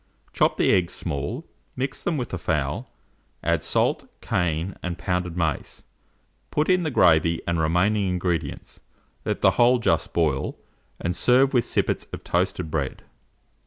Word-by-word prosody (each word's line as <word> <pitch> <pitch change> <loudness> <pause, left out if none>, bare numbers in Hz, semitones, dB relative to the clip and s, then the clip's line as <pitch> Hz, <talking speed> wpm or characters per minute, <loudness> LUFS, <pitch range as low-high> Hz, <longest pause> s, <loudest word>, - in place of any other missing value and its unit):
Chop - - +2
the - - +3
eggs 90 -2 +2
small; 85 - -3 0.3
mix 135 +1 -3
them 175 -5 0
with 125 -4 -3
the 95 - -4
fowl; 75 -5 -2 0.5
add - - +1
salt, - - 0
cayenne, 85 +1 -1
and 90 -1 -4
pounded 90 -1 -2
mace, 80 -5 -2 0.7
put 150 +3 0
in 185 0 +3
the 160 - -1
gravy 85 - +4
and 85 -1 0
remaining 95 +5 +2
ingredients; 90 -2 -3 0.5
let - - -2
the - - +6
whole 125 +1 +6
just 120 - +1
boil, 75 -5 0 0.4
and 85 +1 -2
serve 130 +8 +4
with 120 -2 +3
sippets - - 0
of - - -6
toasted 90 -2 -1
bread. 75 -4 -3
90 Hz, 150 wpm, -24 LUFS, 80-120 Hz, 0.7 s, the